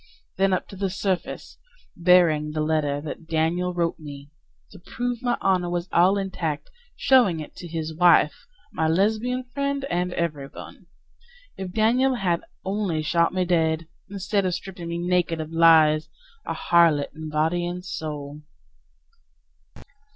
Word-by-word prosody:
Then 195 0 +3
up 185 - -1
to - - -10
the 195 0 -2
surface, 190 -1 -3 0.4
Bearing 170 -4 +3
the 155 - -3
letter 150 -2 0
that 160 +2 -8
Daniel 165 +3 0
wrote 170 -1 -1
me 145 -2 -10 0.4
To - - -13
prove 245 +5 -4
my 245 -2 0
honor 185 -2 +1
was 175 0 -2
all 185 +4 +4
intact, 175 -6 -3 0.2
showing 240 -11 +4
it 155 - -9
to 175 - -8
his 160 -1 -4
wife, 170 - +4 0.3
My 160 - 0
Lesbian 220 +9 +1
friend 280 0 -1
and 180 +1 0
everyone. 150 -5 -5 0.7
If 190 -1 -6
Daniel 245 +6 +2
had 180 -7 0 0.2
only 190 -5 -1
shot 170 +2 +2
me 185 0 0
dead! 165 -2 +1 0.2
Instead 200 +1 -1
of 180 -2 0
stripping 185 -2 -8
me 170 - -3
naked 175 -2 0
of 155 0 -5
lies 160 -2 +5 0.4
A - - -2
harlot 165 -4 +3
in 155 0 -7
body 160 +3 0
and 180 +1 -6
soul. 150 -4 -6
175 Hz, 145 wpm, -24 LUFS, 160-190 Hz, 0.7 s, lies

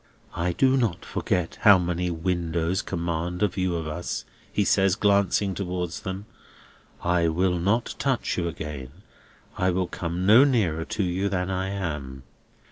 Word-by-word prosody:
"I 85 +1 0
do 135 +7 +3
not 115 -9 -1
forget 90 -3 -2
how 100 -2 +8
many 90 0 -1
windows 85 +1 -1
command 85 0 -2
a - - +5
view 90 -1 -1
of 80 -2 -3
us," 85 +3 -4 0.3
he 105 - +1
says, 95 -1 +3
glancing 100 -2 +2
towards 90 -2 -3
them. 95 0 -5 0.8
"I 85 -1 +2
will 90 +2 +1
not 100 +7 +1
touch 135 -3 0
you 85 -2 -1
again; 75 -5 -6 0.7
I 95 - +3
will 90 0 +1
come 85 +1 -3
no 110 +7 +8
nearer 100 - +1
to 105 - -2
you 95 +2 0
than 90 -1 -1
I 95 +1 -1
am. 75 -9 -4
90 Hz, 155 wpm, -25 LUFS, 85-100 Hz, 0.8 s, how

